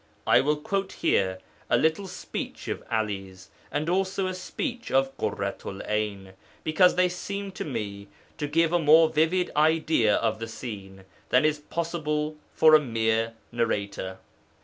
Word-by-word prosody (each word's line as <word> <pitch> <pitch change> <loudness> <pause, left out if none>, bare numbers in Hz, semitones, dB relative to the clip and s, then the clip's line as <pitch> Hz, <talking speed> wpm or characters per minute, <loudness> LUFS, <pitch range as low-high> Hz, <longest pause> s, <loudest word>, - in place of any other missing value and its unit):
I - - +5
will 150 +2 +2
quote 195 +6 -2
here 95 -1 +1 0.3
a - - +4
little 160 +5 +1
speech - - -6
of - - -3
'Ali's, 95 -4 -3 0.2
and 150 - -1
also 190 +2 0
a 185 - -2
speech 235 - -5
of 135 0 +2
Ḳurratu'l 100 0 -4
'Ayn, 105 -3 -2 0.3
because 180 +4 +4
they 180 0 +4
seem 200 +2 -5
to - - -5
me 105 -7 -5 0.3
to 145 - -1
give 165 +3 +2
a 175 - +4
more 160 +1 +6
vivid 160 +4 +1
idea 155 -7 +3
of 110 -1 0
the 115 - -4
scene 100 -5 -8 0.3
than 130 +4 +4
is 155 -1 +2
possible 155 -1 -2 0.2
for 155 -1 +5
a 155 - +9
mere 115 -2 0 0.2
narrator. 100 -5 -2
150 Hz, 150 wpm, -26 LUFS, 105-165 Hz, 0.3 s, a